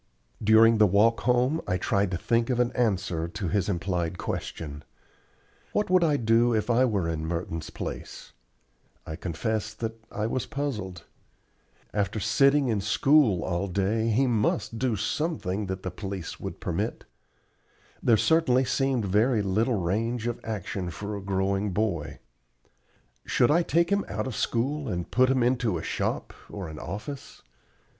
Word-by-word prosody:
During 110 +1 +6
the 105 - +7
walk 105 +5 +3
home 125 +6 +2
I 90 - +1
tried 100 +1 +1
to 90 - -2
think 115 +5 +1
of 125 -2 0
an 125 0 +2
answer 95 -8 0
to 95 +2 -4
his 100 0 0
implied 90 -2 -1
question. 75 -4 -5 0.9
What 210 -3 0
would 185 -1 +5
I 150 -3 +3
do 115 0 +3
if 110 +2 0
I 125 +2 +4
were 100 -8 0
in 80 -1 -2
Merton's 85 -1 -4
place? - - -7 0.7
I 80 - -5
confess 110 +6 -3
that 115 -1 -5
I 105 - -2
was 115 +2 -2
puzzled. 105 - -4 0.9
After 100 +1 -1
sitting 140 +7 +3
in 110 -4 0
school 110 - +3
all 90 +2 -1
day 100 +5 0
he 120 +5 +3
must 115 -1 0
do 125 -4 +1
something 105 - -2
that 95 0 -4
the 95 - -3
police 95 -2 -6
would - - -6
permit. - - -3 1.0
There 115 -2 +4
certainly 130 +1 +3
seemed 130 -2 0
very 105 +3 +2
little 110 +4 +1
range 110 +6 -1
of 120 -1 -2
action 100 -4 -4
for 100 +4 -5
a 100 - -5
growing 95 +1 -1
boy. 90 -7 -1 1.1
Should 120 - +2
I 170 +3 +4
take 170 +1 +1
him 200 0 +2
out - - -3
of 130 -4 -4
school 135 +5 -1
and 90 -1 -4
put 130 +2 +4
him 130 -2 +2
into 120 -6 +1
a 80 - -6
shop - - -2 0.2
or 95 -5 -6
an 75 -1 -8
office? 105 - -7
110 Hz, 160 wpm, -27 LUFS, 95-125 Hz, 1.1 s, the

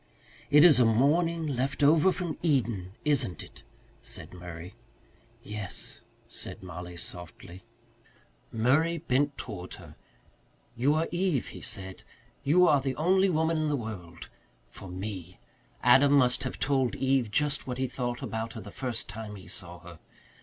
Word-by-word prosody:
"It 150 +1 +7
is 155 -7 +8
a 125 - +6
morning 160 +9 +2
left 135 0 -1
over 155 +5 +6
from 175 -4 -4
Eden, 115 - 0
isn't 130 - +1
it?" - - -15 0.4
said - - -9
Murray. 90 +1 -9 0.7
"Yes," 105 -2 -7 0.3
said - - -8
Mollie 90 -1 -8
softly. 85 +1 -10 0.9
Murray 140 +9 +2
bent 145 -2 0
toward 90 -6 -6
her. - - -13 0.8
"You 135 +5 +2
are 160 +1 +1
Eve," 175 -6 0
he - - -10
said. 95 -1 -5 0.4
"You 175 +6 +5
are 145 -4 +4
the 130 -1 -2
only 190 +6 +3
woman 160 -1 +1
in 155 -1 0
the 145 - +1
world 95 -9 -7 0.4
for 95 - -10
me. 90 -1 -6 0.4
Adam 135 +4 +6
must 130 -1 +4
have 130 - -4
told 135 -3 +1
Eve 135 -3 +1
just 145 +6 0
what 125 -1 -3
he 130 - 0
thought 120 -1 -3
about 115 0 -4
her 110 - -7
the 105 - -10
first 125 -1 -3
time 105 +1 -7
he 95 - -12
saw 90 -2 -6
her. 85 -1 -12
125 Hz, 155 wpm, -29 LUFS, 95-150 Hz, 0.9 s, is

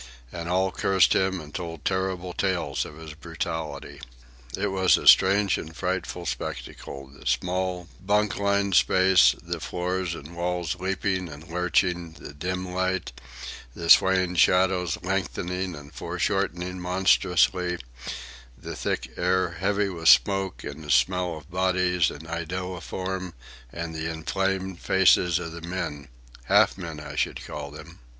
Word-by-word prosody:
And 85 0 -5
all 95 +1 +2
cursed 95 0 +3
him 95 -1 +1
and 75 -2 -11
told 85 -4 -6
terrible 95 -1 -1
tales 90 -8 -1
of 75 - -11
his 80 -1 -9
brutality. 80 0 -5 0.6
It 100 +1 0
was 95 -1 +4
a - - -6
strange 100 +1 +6
and 80 0 -9
frightful 90 -1 -3
spectacle—the 70 -4 -6
small, 90 -1 -1 0.2
bunk 105 +1 +1
lined 100 -1 +1
space, 95 -8 +5
the - - -4
floor 90 +1 -2
and 85 -3 -5
walls 85 -1 -2
leaping 95 -1 -1
and 75 +2 -11
lurching, 90 0 0
the 70 - -11
dim 90 +4 -4
light, 95 0 -1 0.6
the 85 -1 +1
swaying 95 -1 +5
shadows 90 -2 +3
lengthening 90 -1 -2
and 70 -1 -12
fore - - -5
shortening 90 +2 -1
monstrously, 90 0 +2 0.8
the 80 +6 -7
thick 65 - -3
air 90 0 +1
heavy 100 +3 0
with 80 -3 +2
smoke 95 -2 +4
and 75 +2 -7
the 75 - -10
smell 85 +6 +2
of 80 +2 -14
bodies 90 -2 +2
and 80 +2 -10
iodoform, 90 +2 -4 0.4
and 85 -1 -5
the 80 +1 -3
inflamed 95 +3 -2
faces 90 -2 +4
of 85 -2 -5
the 85 0 -8
men—half 70 -9 -1
men, 85 -5 -7
I 75 - -8
should - - -2
call 75 -1 -6
them. 75 +1 -12
90 Hz, 140 wpm, -26 LUFS, 80-95 Hz, 0.8 s, strange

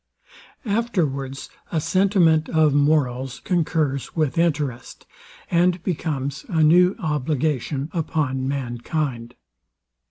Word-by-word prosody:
Afterwards 160 - -2 0.2
a 165 - +1
sentiment 175 -3 +2
of 155 -3 +3
morals 135 -4 +1
concurs 155 -6 -1
with 155 -5 0
interest, 145 -7 -2 0.5
and 175 0 +2
becomes 145 -6 -3
a 160 -2 +2
new 180 +4 +5
obligation 150 -2 -1
upon 145 -6 -1
mankind. 125 -1 -3
150 Hz, 90 wpm, -22 LUFS, 135-170 Hz, 0.5 s, new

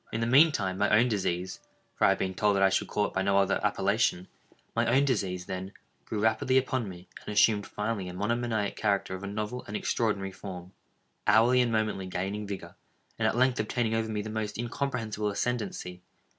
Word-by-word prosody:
In 110 - -2
the 115 - 0
mean 140 +7 +6
time 95 -8 -2
my 105 - +3
own 115 +4 +4
disease—for 95 -3 -4
I - - +6
have 95 - +3
been 95 -1 -2
told 105 +1 +2
that 95 - +3
I 95 - +5
should 95 - +1
call 105 - 0
it - - -5
by 95 - 0
no 100 0 +2
other 100 -1 +2
appellation—my 110 +5 -1
own 135 +4 +4
disease, 95 -9 -1
then, 95 +2 -5 0.3
grew 105 - -3
rapidly 110 +4 +2
upon 130 -4 0
me, 90 -1 -11 0.2
and - - -6
assumed 105 0 +3
finally 105 -3 -3
a - - -7
monomaniac 110 +1 -1
character 100 -3 0
of 95 +1 -6
a - - -4
novel 105 +4 -4
and 105 - -3
extraordinary 105 -4 -1
form—hourly 100 +6 0
and 120 -2 +1
momently 110 -4 -1
gaining 100 +3 -3
vigor—and 100 -1 -6
at - - 0
length 130 -1 +3
obtaining 110 +1 0
over 115 0 0
me 105 -1 -2
the 110 - -6
most 105 -1 -3
incomprehensible 115 -3 -2
ascendancy. 100 -5 -3
105 Hz, 190 wpm, -29 LUFS, 95-115 Hz, 0.3 s, mean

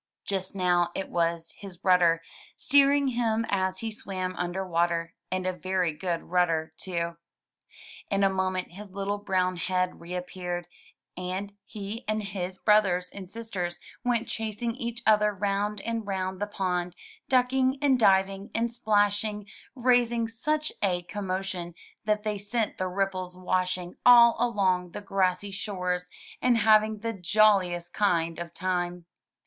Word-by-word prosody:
Just 190 0 -2
now 175 -2 +2
it 195 - -3
was 170 -1 0
his 190 -4 -9
rudder, 175 -3 +4 0.3
steering 280 0 +4
him 230 -2 0
as 190 -1 0
he 225 -1 -3
swam 185 -3 -3
imder 180 +2 -3
water 170 -1 0
— - - -54
and 185 0 -1
a 185 - 0
very 185 -2 -1
good 170 +1 -3
rudder, 165 -3 +1
too. 170 -2 -3 0.9
In 200 0 +1
a - - +6
moment 185 -1 -1
his 200 +3 -10
little 200 +1 -3
brown 185 -2 0
head 185 +1 -1
reappeared, 180 0 -4 0.5
and 185 +3 -4
he 210 +3 -6
and 215 0 0
his 190 -2 -4
brothers 190 -4 +3
and 190 -2 -8
sisters 200 -6 -4 0.3
went 240 -2 +1
chasing 225 +1 -3
each 235 -1 -4
other 210 -1 +5
round 205 +1 -1
and 230 -1 -3
round 190 -1 -2
the 205 - 0
pond, 180 -3 -2 0.3
ducking 260 +1 +3
and 270 -3 +3
diving 195 -1 +3
and 230 +1 +1
splashing, 210 -2 +1 0.3
raising 240 -2 +2
such 305 +7 -1
a 180 -3 +1
com 200 +3 -6
motion 185 -2 -3 0.3
that 210 -1 +1
they 210 -2 -2
sent 215 +2 -2
the 185 - 0
ripples 185 -1 -2
washing 185 -1 -1
all 235 -1 +8
along 190 -7 +1
the - - -5
grassy 195 0 0
shores, 180 -3 -3 0.3
and 245 -2 +4
having 215 -1 +4
the 230 0 -2
jolliest 185 -3 +2
kind 170 -5 +1
of 175 - -4
a - - -26
time. 180 -1 -2
195 Hz, 150 wpm, -28 LUFS, 180-215 Hz, 0.9 s, all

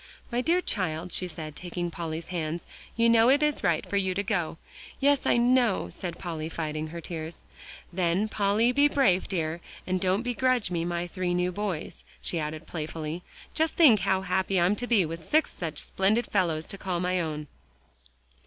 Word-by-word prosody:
"My 240 +1 +1
dear 340 +7 +2
child," 180 - -2
she 185 - 0
said, 155 -3 -7
taking 175 0 -4
Polly's 165 -1 -5
hands, 170 -1 -3 0.3
"you 230 0 +4
know 230 +1 +6
it 285 +3 +4
is 300 -1 +1
right 170 -5 +2
for 200 - -1
you 190 -2 +1
to 200 - 0
go." 175 -6 -1 0.4
"Yes, 285 0 +3
I - - +4
know," 240 -3 +3
said 175 -3 -6
Polly, 160 -3 -4
fighting 155 -1 -3
her 170 +2 -7
tears. 160 0 -6 0.5
"Then, 180 +3 +1
Polly, 215 +3 +2
be 285 +3 +5
brave, 240 -11 +2
dear, 165 -2 -2 0.2
and 185 0 -1
don't 190 +4 +1
begrudge 245 -3 +1
me 170 -2 0
my 175 0 -1
three 175 0 -2
new 180 0 +1
boys," 185 -4 -4 0.2
she 170 - -1
added 155 +1 -4
playfully. 160 +1 -4 0.3
"Just 320 0 +1
think 265 -11 +7
how 190 +1 +1
happy 190 +1 +1
I'm 175 +4 +3
to 245 - -3
be, 215 -7 +4
with 165 +1 -6
six 310 - +2
such 160 -4 -5
splendid 205 +9 +1
fellows 165 -5 0
to 195 - -3
call 180 -3 -2
my 180 +1 +1
own." 155 -2 -3
180 Hz, 185 wpm, -28 LUFS, 165-215 Hz, 0.5 s, think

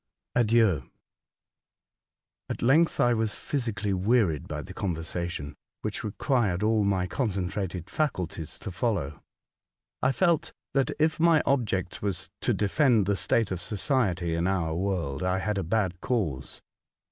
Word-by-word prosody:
ADIEU. 110 - +3 1.6
AT - - -4
length 155 +7 +4
I 120 0 +4
was 110 -2 0
pliysically 115 -7 -2
wearied 95 - +2
by - - -4
the - - -9
conversation, 85 -4 -3 0.3
wiiich 105 - -2
required 105 - 0
all 110 -1 +3
my 95 -2 +1
con 115 +6 -1
centrated 95 -2 -3
faculties 90 - -2
to 95 - -6
follow. 90 - -2 0.8
I 130 - +3
felt 170 +1 +1 0.2
that 135 -1 +2
if 155 +1 +2
my 165 -2 +5
object 105 -9 0
was 95 -3 -3
to - - +1
defend 110 0 +3
the 100 +1 +1
state 110 +1 +1
of 90 -2 -2
society 95 - 0
in 85 +2 0
our 85 -4 0
world, 85 -6 -1
I 90 0 +1
had 105 +1 -1
a - - -1
bad 90 -1 0
cause. 90 - -2
100 Hz, 140 wpm, -27 LUFS, 90-120 Hz, 1.6 s, my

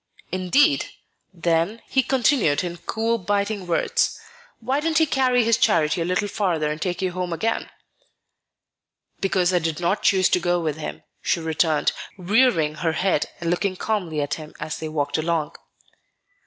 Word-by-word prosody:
"Indeed! 185 - +3 0.4
Then," 170 +4 0
he 265 - +2
continued 245 - +2
in 175 -1 -4
cool, 230 +4 -1
biting 200 0 -1
words, 170 - +1 0.4
"why 260 +5 0
didn't 315 +1 0
he 320 - +5
carry 255 -4 +2
his 230 0 +3
charity 160 +1 +2
a - - 0
little 180 +3 0
farther 170 -7 0
and 155 +2 -5
take 180 0 -2
you 185 - 0
home 180 0 -3
again?" 220 +7 -1 1.5
"Because 185 -2 +1
I 180 - +4
did 160 -1 -2
not 175 +4 0
choose 190 -3 +4
to - - +3
go 175 0 +1
with 155 -3 -2
him," 155 - -6 0.2
she - - 0
returned, 160 -1 +1 0.3
rearing 185 -5 +2
her 165 0 -1
head 185 -2 0
and 170 0 -1
looking 185 +2 0
calmly 180 -7 -2
at 145 - -3
him 155 0 -12
as 155 - -4
they 160 - -4
walked 150 0 -1
along. 160 -1 -1
180 Hz, 165 wpm, -23 LUFS, 160-210 Hz, 1.5 s, he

